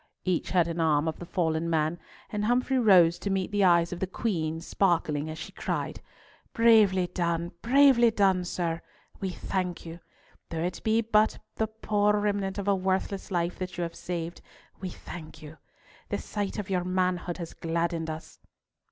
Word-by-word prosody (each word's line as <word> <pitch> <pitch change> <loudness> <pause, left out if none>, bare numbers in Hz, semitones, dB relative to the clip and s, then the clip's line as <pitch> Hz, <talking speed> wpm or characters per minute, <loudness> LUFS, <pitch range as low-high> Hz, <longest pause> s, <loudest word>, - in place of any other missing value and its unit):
Each 185 -3 0
had 175 -3 +3
an 170 0 -3
arm 155 -1 +2
of 160 - -3
the 175 - -8
fallen 165 -2 0
man, 160 +1 0 0.3
and 210 0 -1
Humfrey 250 +3 +2
rose 180 -7 +6
to 200 - -3
meet 195 0 -1
the 205 -1 +2
eyes 170 -1 +4
of 175 - -6
the 190 - -1
Queen 165 -6 -2
sparkling, 165 -4 0
as 155 - -6
she 160 - -7
cried, - - -3 0.5
"Bravely, 215 -6 +5 0.5
bravely 255 -1 +6
done, 195 -4 +2
sir! 170 -2 -2 0.4
We 190 - -2
thank 180 -1 -3
you. 165 +1 -8 0.5
Though 165 -1 -3
it 180 +1 -3
be 220 +1 +3
but 215 -1 +2 0.2
the 220 - +1
poor 210 -1 +1
remnant 205 -2 -1
of 200 0 -4
a 200 - +4
worthless 190 +1 -1
life 175 -2 -1
that 185 -1 -5
you 175 - -1
have 170 0 -4
saved, 170 -1 -5 0.4
we 185 - -4
thank 160 -2 -10
you. 155 +1 -11 0.5
The - - -1
sight 205 -2 -4
of 205 -2 -4
your 180 -2 +1
manhood 180 -1 -1
has 170 -3 -6
gladdened 165 0 -2
us." 155 +1 -8
180 Hz, 175 wpm, -28 LUFS, 165-205 Hz, 0.5 s, rose